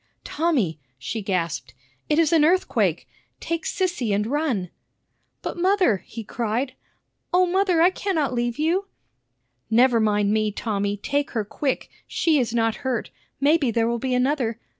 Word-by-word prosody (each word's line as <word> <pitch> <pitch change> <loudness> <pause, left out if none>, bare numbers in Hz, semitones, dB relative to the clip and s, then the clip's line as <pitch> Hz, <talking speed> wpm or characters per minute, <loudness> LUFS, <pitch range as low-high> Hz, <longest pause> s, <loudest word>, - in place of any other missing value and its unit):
"Tommy," 275 - 0 0.2
she 175 - -4
gasped, 170 -10 -2 0.3
"it 300 - +2
is 330 0 +3
an 320 -2 +5
earthquake! 360 +4 +2 0.3
Take 335 0 -3
Sissy 350 - 0
and 210 +1 0
run." 245 - -1 0.7
"But, - - -4
mother," 370 - +3
he 225 +4 -9
cried, 235 +4 -2 0.6
"O 365 +1 +4
mother, 365 -2 +2
I 360 - +6
cannot 330 -9 -1
leave 240 -1 -1
you!" 345 +6 +1 0.8
"Never 235 +1 +4
mind 210 -2 +2
me, 215 -1 +1
Tommy; 205 -1 -2
take 285 +7 -1
her 215 - 0
quick! 265 +6 -2 0.2
She 315 -4 +2
is 240 -3 0
not 225 -1 +1
hurt. 255 -4 -3 0.3
Maybe 290 -1 +3
there 230 0 +1
will 235 0 -1
be 255 +1 -1
another. 250 -3 0
250 Hz, 150 wpm, -24 LUFS, 220-320 Hz, 0.8 s, I